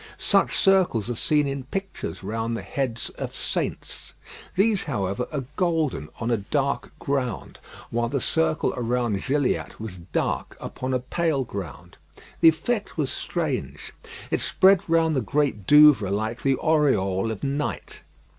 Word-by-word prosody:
Such - - +2
circles 180 - +3
are - - -3
seen 150 +3 +1
in 135 -1 -4
pictures 195 - -5
round 115 +3 -2
the - - -6
heads 125 -4 -3
of - - -5
saints. - - -4 0.4
These, 205 +1 +2
however, 100 -5 -2
are 140 -3 -2
golden 160 - 0
on 120 +1 -1
a 115 - +3
dark 135 +7 -1
ground, 130 -6 -3 0.3
while 115 0 0
the 140 - 0
circle 160 +3 0
around 120 -4 -1
Gilliatt 140 -1 -1
was 105 -5 -7
dark 85 +2 -2
upon 130 0 -3
a - - +1
pale 145 +2 0
ground. 100 - -8 0.4
The 165 - +8
effect 205 +8 -2
was 145 -4 0
strange. 130 - -3 0.4
It - - +1
spread 190 -1 +4
round 165 -1 +3
the 130 - +1
Great 130 -4 -1
Douvre 150 -9 +7
like 110 +4 -2
the 135 -1 +2
aureole 115 - +2
of 110 -3 -5
night. 135 - -3
130 Hz, 145 wpm, -25 LUFS, 110-155 Hz, 0.4 s, The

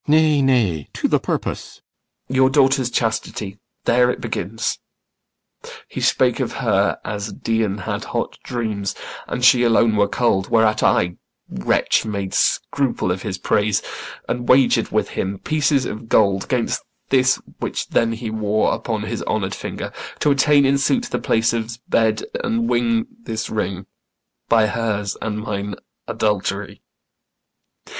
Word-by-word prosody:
CYMBELINE. 150 +1 +5
Nay, 155 -2 +3
nay, 110 - +1
to - - 0
th' - - +2
purpose. - - -3 0.5
IACHIMO. 130 - -5
Your 130 0 +5
daughter's 135 -2 +3
chastity 110 -4 -2 0.3
there 125 +1 +4
it - - -2
begins. 110 -1 -3 1.1
He - - -6
spake - - +2
of - - -2
her - - +1
as 105 0 -4
Dian 110 -3 -1
had 95 - -4
hot - - -3
dreams 110 -5 -3 0.3
And 125 - -1
she 125 -1 +7
alone 115 -2 +4
were 100 -1 +3
cold; 100 -4 +1
whereat 110 -1 +3
I, 90 0 +2 0.3
wretch, - - +1
Made 100 -3 -4
scruple 135 -9 +1
of 95 +1 -2
his 95 - -4
praise, 105 +2 +1 0.4
and 120 0 -3
wager'd 130 0 +4
with - - 0
him 95 +1 -3
Pieces 145 0 +1
of 115 0 -6
gold 100 -3 +3
'gainst 125 -3 0 0.3
this 130 -1 +3 0.2
which - - -3
then 115 0 +2
he 115 -1 -5
wore 110 -1 +1
Upon - - -3
his - - -4
honour'd - - -1
finger, - - -6 0.2
to 150 - +2
attain 140 0 +4
In 140 +1 +3
suit 240 - +2
the - - -1
place 115 +1 +1
of's 115 0 -3
bed, 110 -2 +1 0.2
and 230 0 0
win 230 -1 +1 0.2
this 110 - -4
ring 100 -3 -2 0.6
By 115 -1 +5
hers 105 -3 -1
and 105 -1 -2
mine 100 -2 -4 0.3
adultery. 105 -1 -2
115 Hz, 150 wpm, -21 LUFS, 105-130 Hz, 1.1 s, she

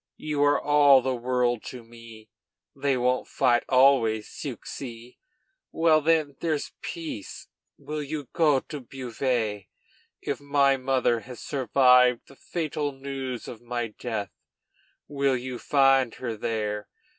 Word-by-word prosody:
you 150 -2 -1
are 145 0 +4
all 145 -2 +6
the 130 -1 0
world 120 -1 0
to 125 -2 -8
me. 115 -1 -14 0.5
They 140 -2 0
won't 125 +1 0
fight 120 -3 +2
always, 125 -5 +4
'ceux - - -6
ci.' 120 -2 -9 0.5
Well, 160 -1 +3
when 155 -3 +1
there's 155 -3 -2
peace, 160 - -7 0.3
will 150 0 -5
you 145 -1 -5
go 150 -6 +3
to 150 - -8
Beauvais? 120 -5 -3 0.5
If - - -4
my 140 -1 +3
mother 130 -3 +1
has 125 +1 -11
survived 125 -2 +4
the 135 - -16
fatal 155 -2 -3
news 135 -2 -6
of 120 - -9
my 120 -1 -3
death, 105 -2 -5 0.8
you 145 - -12
will 130 -3 0
find 135 -3 +3
her 120 -3 -4
there. 105 -1 -3
130 Hz, 135 wpm, -26 LUFS, 120-145 Hz, 0.8 s, all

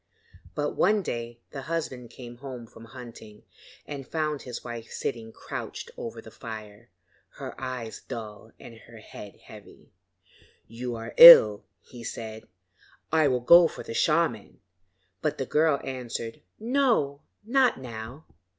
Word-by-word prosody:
But 145 0 -1
one 205 +2 +2
day 120 -4 -5
the 135 - -6
husband 135 -6 -4
came 120 -1 -11
home 125 -2 -8
from 115 0 -15
hunting 115 -3 -12 0.4
and 140 -3 -7
found 155 -3 -2
his 125 -2 -7
wife 115 -1 -8
sitting 115 -4 -4
crouched - - -7
over 115 0 -7
the 110 - -12
fire 110 0 -10 0.5
her - - -7
eyes 125 -4 -5
dull 110 0 -8
and 115 - -12
her 115 -1 -13
head 105 -2 -11
heavy. - - -15 0.8
'You 120 +1 -5
are 115 0 -7
ill,' 105 -12 +11 0.2
he 120 +4 -12
said, 110 -1 -7 0.6
'I 160 -1 +4
will 130 -2 +1
go 170 +7 +8
for - - -9
the - - -7
shaman,' 155 -6 0 0.6
but 150 - -1
the 135 - -2
girl 150 0 +2
answered: 120 -3 -6 0.2
'No, 225 - +1 0.2
not 255 - +2
now. 125 +3 -8
125 Hz, 140 wpm, -27 LUFS, 115-150 Hz, 0.8 s, ill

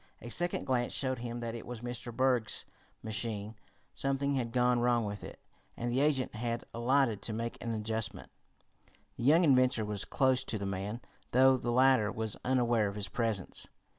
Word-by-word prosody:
A 120 - -8
second 175 +8 +2
glance 125 -2 0
showed 130 -2 -1
him 120 0 -5
that 115 -1 -3
it 115 - -6
was 120 -2 -6
Mr. 120 0 -5
Berg's 125 -2 +1 0.4
machine. 110 -1 -2 0.4
Something 140 +1 0
had 120 -4 -1
gone 125 0 +3
wrong 120 -1 +2
with 105 -1 -5
it, - - -9 0.4
and 120 0 -2
the 125 - +1
agent 140 -3 +1
had 115 +1 -3
alighted 120 -2 +2
to 110 - -4
make 115 +1 -4
an 115 - -2
adjustment. 110 -2 -3 0.8
The - - -6
young 160 +6 +6
inventor 130 -6 +4
was 105 -1 -2
close 130 -2 +2
to 110 - -2
the 100 - -4
man, 100 +4 -4 0.3
though 130 +1 +6
the 125 -1 -3
latter 125 -3 +4
was 110 -2 -3
unaware 120 -4 +2
of 100 - -5
his 100 -2 -3
presence. 110 -3 -2
120 Hz, 180 wpm, -32 LUFS, 110-130 Hz, 0.8 s, young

